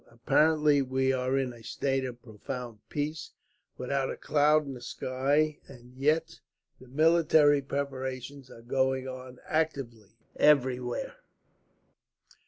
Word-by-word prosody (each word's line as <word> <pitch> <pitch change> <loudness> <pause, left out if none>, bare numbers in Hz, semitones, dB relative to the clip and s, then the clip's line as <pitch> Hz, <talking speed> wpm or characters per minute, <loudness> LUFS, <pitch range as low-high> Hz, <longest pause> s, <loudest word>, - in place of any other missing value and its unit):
Apparently 150 +5 +3
we 130 0 0
are 130 +1 0
in 130 -2 -1
a 115 -1 -14
state 135 +3 -1
of 125 -1 -8
profound 115 +1 -7
peace, 155 +2 -4 0.4
without 135 +1 -1
a - - -5
cloud 150 +1 +3
in 140 - -6
the 125 - -10
sky, 140 +5 0
and 125 -2 -15
yet 155 +4 0 0.4
the 130 - -15
military 155 0 +4
preparations 135 -1 -5
are 115 - -13
going 130 +1 0
on 130 -1 -8
actively, 125 -10 -3 0.2
everywhere. 125 -4 +2
130 Hz, 120 wpm, -29 LUFS, 125-145 Hz, 0.4 s, military